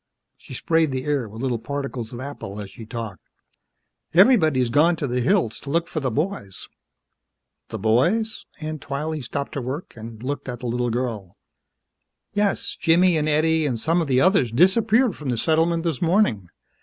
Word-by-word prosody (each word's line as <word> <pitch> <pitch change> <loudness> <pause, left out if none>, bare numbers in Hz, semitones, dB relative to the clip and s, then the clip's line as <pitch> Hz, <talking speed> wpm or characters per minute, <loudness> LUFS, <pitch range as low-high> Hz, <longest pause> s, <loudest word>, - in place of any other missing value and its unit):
She 130 - -11
sprayed 160 +2 +1
the 130 0 -3
air 140 -7 -1
with 110 +4 -8
little 125 -3 -1
particles 135 -3 -5
of 120 - -7
apple 130 -7 -7
as 100 -2 -7
she 110 +1 -11
talked. 110 -6 -6 0.9
"Everybody's 160 - +5
gone 160 +7 +4
to 150 - -3
the 125 -1 -1
hills 140 - +1
to 140 - -9
look 165 +3 0
for 160 - -3
the 135 -3 -1
boys." 135 - -3 1.0
"The 110 - -5
boys?" 150 - +1 0.2
Aunt 155 -1 -5
Twylee 150 +2 -3
stopped 140 +3 -4
her 140 - -3
work 135 +7 -6
and 115 0 -10
looked 140 +1 -4
at 120 -1 -6
the - - -6
little 120 +1 -1
girl. 115 -6 -4 1.0
"Yes 205 -1 0
Jimmy 170 +2 +4
an' 155 -1 0
Eddie 155 +1 +2
an' 125 -4 -1
some 165 +9 +1
of 160 - -2
the 130 -2 +3
others 180 - +3
disappeared 205 - +3
from 145 -3 -6
the 120 - 0
settlement 165 +4 +1
this 165 -7 -2
morning. 165 - +2
140 Hz, 180 wpm, -23 LUFS, 120-165 Hz, 1.0 s, Everybody's